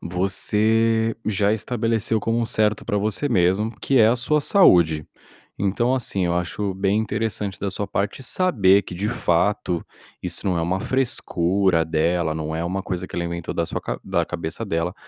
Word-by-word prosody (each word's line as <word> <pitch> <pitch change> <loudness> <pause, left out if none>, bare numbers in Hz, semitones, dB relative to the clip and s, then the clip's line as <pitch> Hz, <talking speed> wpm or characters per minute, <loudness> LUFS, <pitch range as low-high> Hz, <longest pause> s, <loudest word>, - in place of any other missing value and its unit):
você 110 +5 +1
já 105 0 +1
estabeleceu 115 0 0
como 115 +2 -1
um 115 - 0
certo 110 -1 +1
para 105 -3 -1
você 105 +7 0
mesmo, 100 +2 +1
que 135 -2 +2
é 110 -1 +6
a 120 - +2
sua 150 +5 +1
saúde. 85 - +4 0.5
Então, 110 +6 +1
assim, 100 -7 -1
eu 85 - 0
acho 95 +3 -2
bem 100 +2 +1
interessante 110 -3 -2
da 100 -1 -3
sua 100 - -3
parte 100 +8 -3
saber 105 - +3
que 90 - -9
de 100 +4 -2
fato 90 -5 0 0.4
isso - - -2
não 90 -3 +1
é - - 0
uma 95 +3 -1
frescura 95 -9 +1
dela, 80 0 0
não 80 0 -4
é 80 - -2
uma 95 +2 -2
coisa 90 -1 -4
que - - -8
alimenta 85 -1 -4
da 85 - 0
sua - - -4
ca 60 - -4
da 85 -3 0
cabeça 85 +7 -5
dela, 85 +1 -2
100 Hz, 180 wpm, -22 LUFS, 85-110 Hz, 0.5 s, é